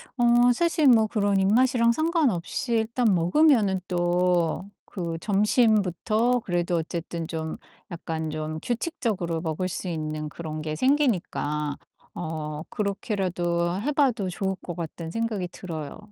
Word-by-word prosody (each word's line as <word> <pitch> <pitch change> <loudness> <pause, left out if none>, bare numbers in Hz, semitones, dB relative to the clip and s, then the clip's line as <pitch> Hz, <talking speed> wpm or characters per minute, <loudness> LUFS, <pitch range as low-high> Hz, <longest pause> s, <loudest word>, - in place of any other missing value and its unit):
어 240 0 +5
사실 320 0 +2
뭐 225 -3 +6
그런 205 -3 +1
입맛이랑 235 +4 +4
상관없이 270 - 0
일단 225 -1 +2
먹으면은 195 - +3
또 175 -1 +1 0.3
그 170 -3 -3
점심부터 215 +2 +2
그래도 175 -3 -1
어쨌든 165 0 -4
좀 160 -1 -4 0.3
약간 160 -2 -4
좀 155 +1 -4
규칙적으로 220 - -2
먹을 165 +2 -2
수 185 +1 -5
있는 155 -2 -3
그런 155 -1 -6
게 155 0 -3
생기니까 170 - 0 0.4
어 155 -2 -5
그렇게라도 185 -3 -1
해 290 - 0
봐도 250 -10 +1
좋을 190 +1 -2
것 175 - -6
같다는 165 0 -6
생각이 220 -2 -2
들어요. 160 -5 -7
185 Hz, 275 characters per minute, -25 LUFS, 165-230 Hz, 0.4 s, 뭐